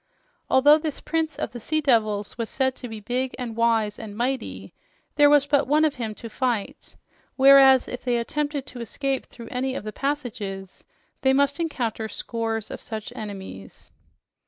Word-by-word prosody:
Although 290 +4 +6
this 310 -2 -4
prince 320 -1 -1
of - - -3
the 240 - -7
sea 310 +7 0
devils 215 -7 +1
was 230 -2 -4
said 265 -1 0
to 250 - -7
be 220 -1 -7
big 250 +4 -2
and 240 -3 -5
wise 225 -3 +1
and 210 -2 -8
mighty, 255 +3 -3 0.4
there 290 -1 +6
was 290 -1 +5
but 285 0 +2
one 305 +3 +4
of 305 - +1
him 220 -2 -3
to 230 - -8
fight; 230 -2 -3 0.4
whereas, 270 -1 +7
if 250 - -6
they 245 -2 +1
attempted 290 +3 -2
to 250 -3 -9
escape 270 +4 -2
through 230 -2 -11
any 260 +1 -2
of - - -4
the 215 0 -6
passages, 210 -9 -4 0.4
they 265 0 +4
must 280 +2 +2
encounter 235 -9 -2
scores 225 -1 -4
of - - -7
such 220 -2 -6
enemies. 190 - -9
250 Hz, 175 wpm, -24 LUFS, 220-275 Hz, 0.4 s, whereas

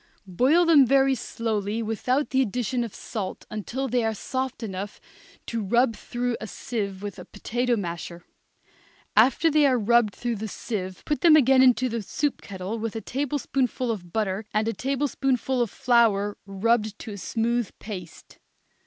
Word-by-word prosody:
Boil 260 - +3
them 320 -4 +7
very 270 +1 +4
slowly 225 -3 -2
without 250 +6 -1
the 265 - +3
addition 245 +1 -1
of 230 - -7
salt 205 -5 -5
until 240 +6 -3
they 245 -1 +1
are 220 -1 0
soft 260 +3 -4
enough 200 -1 -5 0.5
to 230 -1 -3
rub 235 +3 +2
through 245 +2 -3
a 220 - -5
sieve 200 -4 -4
with 205 -1 -6
a - - -9
potato 240 +4 -1
masher. 170 -3 -5 0.9
After 260 +9 +5
they 300 -1 +5
are 255 -2 +3
rubbed 230 -2 +3
through 240 +1 -2
the 220 +2 -4
sieve 190 -3 -5
put 295 - -1
them 330 -3 +7
again 265 -3 +6
into 255 0 +5
the 230 -2 -3
soup 285 +8 -2
kettle 195 +3 -5
with 225 0 -4
a 225 - -3
tablespoonful 260 -2 -1
of 175 -6 -6
butter 205 0 -1
and 215 +1 +2
a 230 - 0
tablespoonful 265 0 0
of 235 - +1
flour 225 -5 +2
rubbed 215 +2 0
to 220 - -8
a 200 - -7
smooth 235 +3 -1
paste. 185 -6 -9
230 Hz, 165 wpm, -25 LUFS, 205-255 Hz, 0.9 s, them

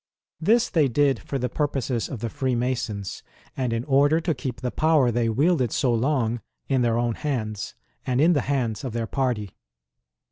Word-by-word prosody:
This 230 +8 +3
they 155 -6 +3
did 135 -1 +2
for 140 - -4
the 125 -1 -1
purposes 130 -3 -1
of 125 -6 -6
the 115 - -2
Freemasons, 120 -6 -2 0.3
and 130 -3 -1
in 115 0 -1
order 145 +3 +3
to 165 0 0
keep 125 -4 -5
the 125 -1 -2
power 155 -6 +3
they 115 0 +1
wielded 135 - +2
so 125 -3 +1
long 120 -2 0 0.3
in 135 -2 +2
their 115 -1 +2
own 120 -1 +1
hands, 110 -8 -3 0.3
and 125 0 0
in 165 +4 +5
the 145 - +2
hands 125 -6 -1
of 130 -4 -4
their 115 -1 -1
party. 120 -6 -1
125 Hz, 180 wpm, -25 LUFS, 115-145 Hz, 0.3 s, in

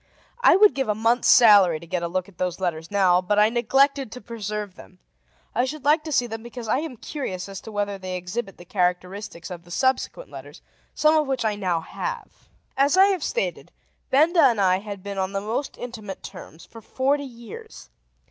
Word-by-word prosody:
I - - +6
would 415 +2 +6
give 270 -4 -2
a 210 - +1
month's 230 +3 +1
salary 200 -9 +7
to 170 - -12
get 170 +1 -3
a 170 - -2
look 185 +1 -3
at 195 -4 -19
those 180 -1 -2
letters 165 -3 -3
now; 185 -3 +3
but 205 +3 0
I 210 +1 +5
neglected 270 +2 +2
to 250 - -8
preserve 210 -4 -5
them. 185 - -16 0.6
I 245 - +1
should 280 +1 -6
like 305 +2 +4
to 310 - -5
see 250 -4 +2
them 225 -1 -6
because 240 0 -8
I 235 - +1
am 300 -5 -6
curious 200 -10 -5
as 195 -1 -8
to 220 - -10
whether 205 -1 -2
they 185 -1 -5
exhibit 195 +3 -5
the 175 - -13
characteristics 180 0 -2
of 175 -1 -8
the 175 - -19
subsequent 260 - -1
letters, - - -11 0.3
some 310 +1 +4
of 305 -2 +2
which 265 -4 -1
I 215 - +1
now 185 -5 -1
have. - - -7 0.3
As 280 +5 +3
I 390 +1 +7
have 360 -5 -4
stated, - - -3 0.4
Benda 325 +5 +4
and 240 -6 +4
I 185 -1 +3
had 200 -2 -8
been 200 -1 -5
on 190 +1 -2
the 195 - -1
most 225 +7 -4
intimate 220 -5 -8
terms 175 -4 -11
for 230 - -13
forty 275 +6 0
years. 265 - -11
215 Hz, 210 wpm, -24 LUFS, 185-270 Hz, 0.6 s, salary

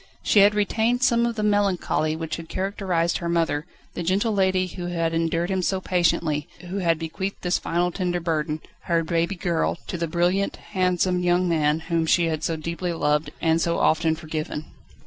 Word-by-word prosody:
She 210 - +4
had 205 +1 +6
retained 225 +4 +1
some 235 -2 +3
of 235 - -3
the 215 - -2
melancholy 200 -6 +1
which 160 0 -4
had 165 -1 -9
characterised 185 -3 -1
her 170 - -3
mother, 165 -2 0 0.3
the - - -4
gentle 195 +6 +1
lady 190 -2 +2
who 175 -1 -6
had 165 -2 -1
endured 165 +1 0
so - - +1
much 185 -2 0
so 190 - 0
patiently, 165 -5 +1
and 175 +1 -11
who 195 - -2
had 170 -4 +2
bequeathed 165 +5 -5
this 180 0 +1
final 175 +1 0
tender 180 -1 -1
burden 155 -2 -2 0.2
her 170 -1 +1
baby 170 +3 0
girl 175 -2 0
to 175 - -5
the 170 - -1
brilliant, 175 +4 +1 0.2
handsome 180 -1 +1
husband 165 -3 +2
whom 165 -1 0
she 170 +1 +4
had 160 -1 -2
so 165 - 0
deeply 170 +3 -3
loved, 150 -1 +1
and 165 0 +2
so 170 0 +1
often 160 0 +2
forgiven. 155 -1 -5
170 Hz, 190 wpm, -24 LUFS, 165-185 Hz, 0.3 s, had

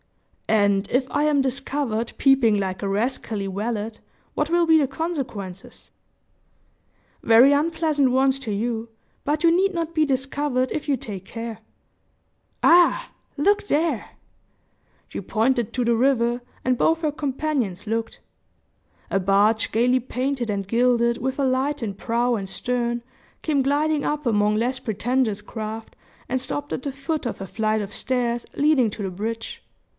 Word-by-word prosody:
"And 200 -2 +2
if 255 +1 +1
I 290 - +1
am 295 -2 +3
discovered 265 -3 -2
peeping 260 -6 +4
like 190 -1 -3
a 200 - -2
rascally 215 -1 -1
valet, 210 +3 -2 0.4
what 300 +1 -1
will 345 0 +3
be 320 -1 +5
the 285 - +2
consequences?" 265 - -5 1.3
"Very 235 +5 +7
unpleasant 305 -2 +2
ones 265 +1 +3
to 245 -6 -5
you; 225 +2 -2 0.3
but 300 +3 -1
you 335 0 +5
need 390 +2 +2
not 335 -1 -3
be 315 -1 +3
discovered 270 -1 -1
if 300 -1 -4
you 275 - +2
take 200 -5 -7
care. 230 +2 -6 1.0
Ah! 345 +1 +5 0.3
Look 405 +8 +3
there!" 295 -7 0 1.0
She - - -6
pointed 235 0 0
to 250 -2 0
the 235 0 +3
river, 240 -1 +2 0.2
and 255 0 +2
both 325 +5 +3
her 305 -3 0
companions 270 -9 -2
looked. 225 +1 -2 0.9
A 195 - +1
barge 205 +4 +3
gayly 250 +3 +3
painted 255 0 -2
and 200 -2 -2
gilded, 235 +1 +2
with 265 +3 -2
a 275 - +2
light 265 +3 0
in 215 -4 -3
prow 235 +4 0
and 195 -3 -4
stern, 240 +2 -2 0.4
came 295 -3 +1
gliding 290 +2 +1
up 300 -1 -2
among 210 -2 +2
less 250 +3 0
pretentious 225 -1 -1
craft, 220 +1 -7 0.3
and 260 - -1
stopped 290 +2 -4
at - - -3
the 280 - -2
foot 275 +2 -3
of 240 - -3
a 195 - -6
flight 215 +2 0
of 200 0 -6
stairs 240 -2 -1
leading 285 -6 +3
to 205 0 -6
the 190 - -3
bridge. 225 +4 -5
250 Hz, 155 wpm, -23 LUFS, 220-285 Hz, 1.3 s, Very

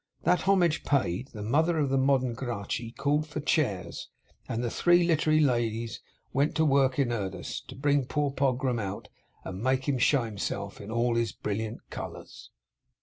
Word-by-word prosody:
That 180 -2 +3
homage 175 -5 +3
paid, 125 -5 0
the 105 -5 -8
mother 160 +9 +2
of 145 -3 +1
the 135 - +3
modern 130 -2 +2
Gracchi 115 -2 -4
called 145 +5 0
for 155 0 -5
chairs, 140 - -1 0.4
and 115 +1 -2
the 120 - -1
three 175 0 +4
literary 155 -2 +3
ladies 115 -5 0 0.3
went 140 +3 +1
to 160 - +3
work 135 -2 +3
in 135 -4 +2
earnest, 95 -5 -4
to - - -9
bring 140 0 +2
poor 145 -1 0
Pogram 130 -2 0
out, 100 -1 -5 0.3
and 95 +1 -6
make 130 +2 +1
him 135 -3 +1
show 135 +1 +4
himself 100 -2 -4
in 100 - -9
all 120 +1 +1
his 115 -1 0
brilliant 110 +2 -4
colours. - - -8
130 Hz, 170 wpm, -28 LUFS, 115-145 Hz, 0.4 s, three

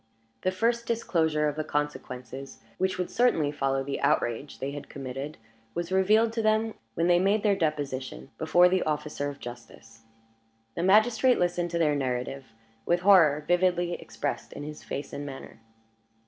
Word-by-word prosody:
The 185 - +1
first 230 +5 0
disclosure 160 -9 +1
of 145 - -2
the 155 - -2
consequences 135 -3 -4 0.2
which 190 0 0
would 180 -1 -3
certainly 195 -12 +2
follow 135 -2 0
the 140 0 -4
outrage 120 +5 0
they 135 +1 -4
had 145 0 -8
committed, 135 +2 -6 0.4
was 175 +1 -3
revealed 215 +4 +3
to 230 - -1
them 220 0 +2 0.2
when 165 - +1
they 175 0 +5
made 200 +3 +2
their 205 -2 +3
deposition 140 - -3
before 175 +3 +5
the 185 0 +2
officer 150 -1 -2
of 140 0 -9
justice. 115 -2 -11 0.7
The - - -3
magistrate 220 +6 +4
listened 175 0 0
to 170 - -2
their 155 -3 +3
narrative 130 0 -3 0.4
with 175 +6 +1
horror 165 -7 +5
vividly 175 -1 +2
expressed 145 -3 -5
in 145 - -7
his 150 +1 -8
face 140 - -6
and 145 - -4
manner. 135 -2 -9
155 Hz, 160 wpm, -27 LUFS, 140-185 Hz, 0.7 s, they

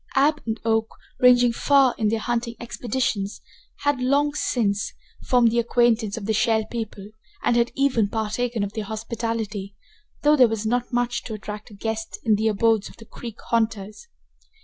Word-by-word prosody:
Ab 295 +2 +3
and 220 0 -2
Oak, 225 -1 +2 0.3
ranging 245 -1 +6
far 270 0 +4
in 215 - 0
their 225 +2 +1
hunting 235 +1 -2
expeditions, 235 -4 -2 0.4
had, 285 -3 +1
long 285 +3 +2
since, 210 -8 0 0.3
formed 245 -3 +4
the 235 - +2
acquaintance 235 -3 +2
of 210 - -5
the 220 - 0
Shell 220 0 +2
People, 215 -4 -5 0.3
and 240 - +2
had 235 0 +2
even 255 -7 +2
partaken 225 +1 -1
of 200 0 -4
their 215 -2 -4
hospitality, 220 -2 -4 0.5
though 295 +1 +6
there 255 -4 +6
was 220 -1 -3
not 245 +3 0
much 245 0 0
to 220 - -5
attract 210 0 -8
a 210 - -13
guest 220 +2 -4
in 220 - +3
the 215 +2 +2
abodes 220 0 +2
of - - -16
the 225 - -13
creek 230 0 -9
haunters. 215 -3 -1
230 Hz, 170 wpm, -24 LUFS, 215-245 Hz, 0.5 s, ranging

